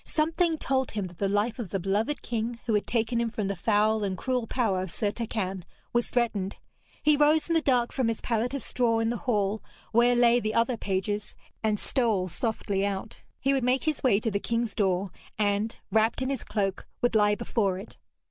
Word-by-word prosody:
Something 325 +1 +1
told 265 -3 0
him 205 -3 -2
that 175 -2 -11
the 200 - +1
life 210 +4 0
of 220 -6 -4
the 195 - -1
beloved 205 +10 -1
king, 230 0 -3
who 230 - 0
had 210 - +1
taken 235 0 +1
him 235 - 0
from 215 -3 -3
the 200 - -1
foul 215 +2 +2
and 190 -2 -2
cruel 250 0 -1
power 210 -8 0
of 185 - -4
Sir 205 +4 -1
Turquine, 200 -5 -3 0.3
was 240 0 +2
threatened. 210 -6 -1 0.5
He 300 0 +5
rose 300 +2 +3
in 335 - 0
the 325 - +3
dark 250 -5 +2
from 260 -4 0
his 230 -1 -1
pallet 235 +3 -1
of 275 - -3
straw 235 -2 +1
in 225 0 +1
the 240 - -2
hall 210 -2 +1 0.3
where 240 +2 +4
lay 240 0 +5
the 215 -2 -2
other 230 +2 +2
pages, 205 0 -2 0.3
and 215 -2 +1
stole 220 -8 +1
softly 205 0 -1
out. 200 +1 -3 0.2
He 275 +1 +2
would 270 -2 +1
make 255 +2 +2
his 310 -3 -1
way 220 -7 +4
to 225 - -1
the 200 - 0
king's 230 +1 -1
door, 190 -2 0 0.3
and, 205 +1 0
wrapped 220 +3 +2
in 260 - -1
his 275 - -3
cloak, 195 -2 -2 0.2
would 245 - +3
lie 210 -1 +4
before 205 -4 0
it. 195 +4 -10
225 Hz, 215 wpm, -27 LUFS, 205-245 Hz, 0.5 s, He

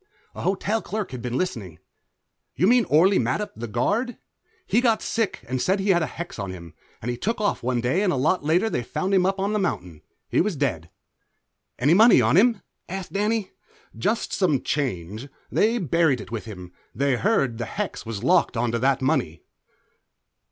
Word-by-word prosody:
A - - -8
hotel 200 +4 0
clerk 210 -1 -4
had 125 -2 -6
been 125 +1 -3
listening. 105 - -3 0.8
"You 155 - +2
mean 240 +2 +4
Orley 180 +6 +4
Mattup, 210 - -1
the 120 +2 -6
guard? 205 - -1 0.5
He 240 - +2
got 230 -3 +2
sick, 225 -3 -1
and 130 +1 -2
said 190 +2 +1
he 195 +1 -1
had 175 -2 +3
a 160 - 0
hex 170 -8 -7
on 100 -1 -3
him, 85 -3 -9 0.3
and 120 +1 -3
took 225 +2 -1
off 205 -1 0
one 125 0 0
day 130 +11 +1
and 200 -3 +2
a - - 0
lot 145 +6 +1
later 170 +8 +2
they 220 - -1
found 190 +10 -3
him 185 -1 +4
up 195 0 -1
on 200 +2 0
the 210 - +1
mountain. 90 - -3 0.3
He - - +2
was 200 -1 -1
dead." 95 - -2 0.9
"Any 140 +7 +3
money 220 +6 +7
on - - +3
him?" 225 +2 +4 0.3
asked 190 0 -6
Danny. 210 0 0 0.4
"Jest 215 +4 -1
some 155 -9 +1
change. 110 - -3 0.2
They 225 +3 +2
buried 165 - +2
it 105 - -10
with 115 -1 -4
him; 90 -5 -9 0.2
they 140 -1 +1
heard 135 - +1
the 115 - -2
hex 200 - -4
was 110 -3 -6
locked 175 -8 +3
onto 115 0 0
that 135 +2 +1
money." 130 - 0
160 Hz, 190 wpm, -24 LUFS, -, 0.9 s, money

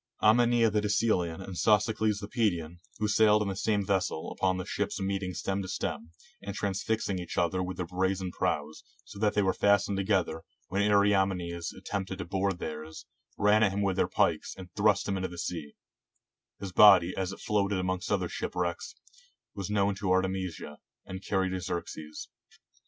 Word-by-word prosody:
Aminias 115 0 +4
the 105 - +2
De 105 - -1
celean 95 -5 +1
and 95 - -8
Sosicles 105 +1 +2
the 100 - -5
Pedian, 85 -8 -1 0.2
who 105 - 0
sailed 105 0 +4
in 100 - -3
the 95 - -3
same 100 0 0
vessel, 95 -4 -1
upon 95 -1 0
the 90 - -4
ships - - -2
meeting 95 -1 -2
stem 100 0 -2
to 95 - -6
stem, 80 -3 -4 0.3
and 100 0 -6
trans 100 -2 -2
fixing 110 -4 -1
each 90 - -6
the - - +3
other 90 +2 -1
with 90 0 -4
their 90 - -2
brazen 95 +1 -1
prows, 75 -2 -2 0.2
so 100 - -11
that 105 -1 +1
they 105 - +3
were 95 - +2
fastened 100 -1 +2
together, 95 -5 0 0.3
when 100 +2 0
Ariamenes 95 -5 +2
attempted 95 -1 -4
to 90 - -5
board 95 +1 -1
theirs, 80 -1 -7 0.3
ran 105 +1 +4
at 105 -3 +4
him 100 +1 -1
with 95 -2 +1
their - - +2
pikes, - - 0
and 90 -2 -11
thrust 105 0 +2
him 100 -1 -1
into 95 0 -2
the 85 - -10
sea; 80 -4 -5 0.8
his 100 -2 -6
body, 95 -3 +7
as 95 -1 -2
it - - -8
floated 100 -1 0
amongst 95 0 -2
other - - +1
shipwrecks, 90 -1 -3 0.6
was 100 0 -5
known 100 -1 +2
to 95 0 -3
Artemisia, 95 -5 -1 0.3
and 95 +1 -7
carried 95 -2 0
to 95 -1 -3
Xerxes. 80 -3 -5
95 Hz, 185 wpm, -29 LUFS, 90-100 Hz, 0.8 s, body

